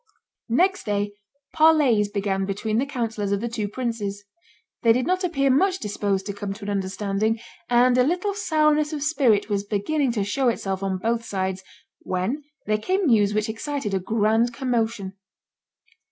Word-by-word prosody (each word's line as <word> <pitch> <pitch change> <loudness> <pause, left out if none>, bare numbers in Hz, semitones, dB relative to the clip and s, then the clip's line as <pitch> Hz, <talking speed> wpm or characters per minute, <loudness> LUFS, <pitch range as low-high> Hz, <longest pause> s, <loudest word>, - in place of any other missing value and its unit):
Next 365 - +2
day 205 0 0 0.4
parleys 295 -10 +4
began 195 -1 -1
between 215 +3 -1
the 275 - 0
councillors 225 -6 -2
of 200 - +1
the 235 - -2
two 225 -3 -3
princes. 210 -3 -4 0.6
They 230 -1 +5
did 250 +1 0
not 370 +3 0
appear 275 -6 +2
much 370 +8 +3
disposed 200 - -2
to 200 - -4
come 200 0 -4
to 200 - -11
an 205 - -2
understanding, 200 +3 -1 0.3
and 245 +1 +4
a - - +6
little 360 +8 0
sourness 305 -5 +2
of 290 -2 -3
spirit 270 -10 +2
was 200 -2 -1
beginning 240 +7 0
to 210 -4 0
show 255 +6 0
itself 195 -4 -2
on 195 -1 -1
both 230 +4 -1
sides, 190 -3 -3 0.4
when 185 +11 -2 0.2
there 215 0 +1
came 375 - 0
news 210 -6 +3
which 215 +1 +1
excited 230 0 -3
a 190 - +2
grand 225 +4 +1
commotion. 225 -7 -2
225 Hz, 170 wpm, -24 LUFS, 200-275 Hz, 0.6 s, a